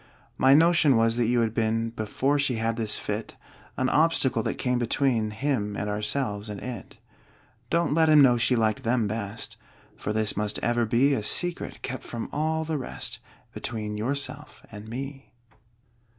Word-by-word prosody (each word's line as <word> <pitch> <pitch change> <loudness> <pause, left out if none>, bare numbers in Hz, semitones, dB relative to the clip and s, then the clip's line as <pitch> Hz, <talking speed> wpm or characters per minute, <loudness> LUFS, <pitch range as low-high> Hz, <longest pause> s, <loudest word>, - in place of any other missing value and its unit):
My 135 +1 +5
notion 165 -3 +5
was 115 0 +3
that 120 -2 +2
you 120 0 +2
had 110 -1 0
been 115 0 0
(Before 125 +6 0
she 140 -3 +1
had 115 0 -1
this 110 -2 0
fit) - - -4 0.4
An 130 - +1
obstacle 140 -6 +2
that - - -3
came 125 -1 0
between 120 -2 +1
Him, 105 -3 -2
and 105 - -3
ourselves, 105 0 -2
and 105 -1 -5
it. 125 +1 -8 0.7
Don't 170 -2 +1
let 160 0 +4
him 155 -1 +7
know 130 -4 +6
she 120 +2 +2
liked 110 -2 +1
them 115 -1 +1
best, 105 0 -5 0.4
For 105 - -4
this 110 0 0
must 105 0 -1
ever 120 -1 +1
be 130 +6 +3
A 115 - 0
secret, 175 +11 -1
kept 130 0 -4
from 115 -1 -6
all 160 +2 0
the 155 -2 -2
rest, 130 - -5 0.3
Between 105 -2 -4
yourself 140 +6 -3
and 105 0 -9
me. 135 +3 -7
120 Hz, 170 wpm, -26 LUFS, 110-140 Hz, 0.7 s, him